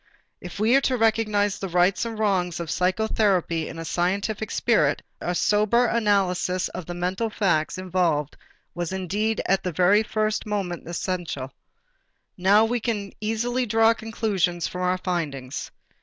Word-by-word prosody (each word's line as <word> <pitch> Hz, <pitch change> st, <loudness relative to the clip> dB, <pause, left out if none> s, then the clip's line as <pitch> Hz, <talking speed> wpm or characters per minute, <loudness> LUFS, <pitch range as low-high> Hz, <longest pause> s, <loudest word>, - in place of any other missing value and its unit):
If 180 Hz, +1 st, -9 dB
we 225 Hz, +4 st, +4 dB
are 275 Hz, -, +5 dB
to 260 Hz, -2 st, +1 dB
recognize 215 Hz, -3 st, +1 dB
the 195 Hz, -, -3 dB
rights 180 Hz, +5 st, +2 dB
and 225 Hz, -1 st, -5 dB
wrongs 185 Hz, -5 st, 0 dB
of 170 Hz, -3 st, -4 dB
psychotherapy 185 Hz, -3 st, +1 dB
in 165 Hz, -, -8 dB
a 165 Hz, -, -6 dB
scientific 195 Hz, +6 st, -1 dB
spirit, -, -, +1 dB, 0.2 s
a 175 Hz, -, -2 dB
sober 215 Hz, +6 st, +3 dB
analysis 195 Hz, -5 st, +1 dB
of 180 Hz, -3 st, -7 dB
the 175 Hz, -, -5 dB
mental 185 Hz, +6 st, -1 dB
facts 175 Hz, -7 st, 0 dB
involved 175 Hz, -6 st, 0 dB, 0.4 s
was 175 Hz, -1 st, -3 dB
indeed 205 Hz, +4 st, -1 dB
at 195 Hz, 0 st, +2 dB
the 180 Hz, -, -3 dB
very 185 Hz, +5 st, +4 dB
first 215 Hz, 0 st, -1 dB
most 195 Hz, -5 st, -2 dB
essential. 170 Hz, -6 st, -4 dB, 0.8 s
Now 200 Hz, +4 st, +4 dB
we 240 Hz, +2 st, 0 dB
can 210 Hz, -3 st, -3 dB
easily 240 Hz, +3 st, -1 dB
draw 225 Hz, +1 st, +4 dB
the 230 Hz, -, +3 dB
conclusions 200 Hz, -6 st, -1 dB
from 180 Hz, -, -6 dB
our 180 Hz, 0 st, +1 dB
findings. 145 Hz, -8 st, -4 dB
190 Hz, 155 wpm, -24 LUFS, 175-220 Hz, 0.8 s, are